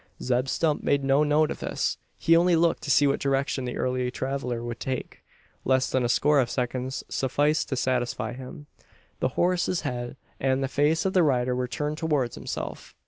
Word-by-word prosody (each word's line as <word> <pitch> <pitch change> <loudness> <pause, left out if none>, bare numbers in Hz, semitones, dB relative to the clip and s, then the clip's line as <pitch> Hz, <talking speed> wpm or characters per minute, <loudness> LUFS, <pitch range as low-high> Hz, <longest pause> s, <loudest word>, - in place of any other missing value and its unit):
Zeb 125 +1 0
Stump 155 +2 0
made 140 -1 +1
no 135 +2 +3
note 150 +1 +2
of - - -5
this. - - -2 0.2
He 165 - +4
only 175 +1 +4
looked 165 0 +2
to 145 - -6
see 145 +1 +5
what 140 - +2
direction 135 -1 0
the 125 - -4
early 125 0 0
traveller 125 -2 -3
would 120 -1 -5
take. 130 -1 -4 0.4
Less 130 0 +2
than 130 - +1
a 120 - 0
score 145 +4 +3
of 125 -3 +1
seconds 130 +1 -3
sufficed 145 +4 0
to 135 - -1
satisfy 125 -1 -1
him. 130 +5 -9 0.5
The - - +2
horse's 180 0 +1
head 125 -3 -4 0.2
and 135 0 +1
the - - 0
face 145 +5 +1
of 190 - +1
the 185 - +5
rider 125 -5 +2
were 125 0 -1
turned 150 +4 -3
towards 145 -7 0
himself. - - -6
135 Hz, 195 wpm, -26 LUFS, 125-150 Hz, 0.5 s, see